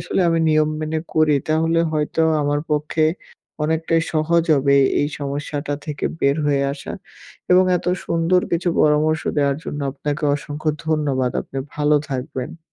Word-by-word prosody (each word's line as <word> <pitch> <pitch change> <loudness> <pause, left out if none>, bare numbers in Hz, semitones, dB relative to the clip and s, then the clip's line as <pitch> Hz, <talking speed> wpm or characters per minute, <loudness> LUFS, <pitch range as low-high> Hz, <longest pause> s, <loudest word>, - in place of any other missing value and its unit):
আসলে - - -1
আমি 165 0 +2
নিয়ম 155 0 +3
মেনে 155 +1 -2 0.2
করি 155 -1 +4
তাহলে 165 +1 +2
হয়তো 150 +1 -1 0.2
আমার 145 0 0
পক্ষে 150 +1 +1 0.6
অনেকটাই 160 +1 +1
সহজ 165 +2 +2
হবে 140 0 +3 0.2
এই 145 - +1
সমস্যাটা 145 +1 -3
থেকে 150 -3 -4 0.2
বের 140 +1 +2
হয়ে 140 -1 +2
আসা। 140 -1 -7 0.6
এবং 185 +1 +6
এত - - -7 0.2
সুন্দর 170 +2 +2
কিছু 175 +1 +1
পরামর্শ 155 +1 +3 0.2
দেওয়ার 140 -1 +2
জন্য 145 - -5
আপনাকে 150 +2 -3
অসংখ্য 150 +2 -3 0.2
ধন্যবাদ। 145 -5 0
আপনি 135 - -7 0.2
ভালো 150 0 +3
থাকবেন। 135 +2 -5
150 Hz, 145 wpm, -21 LUFS, 145-160 Hz, 0.6 s, এবং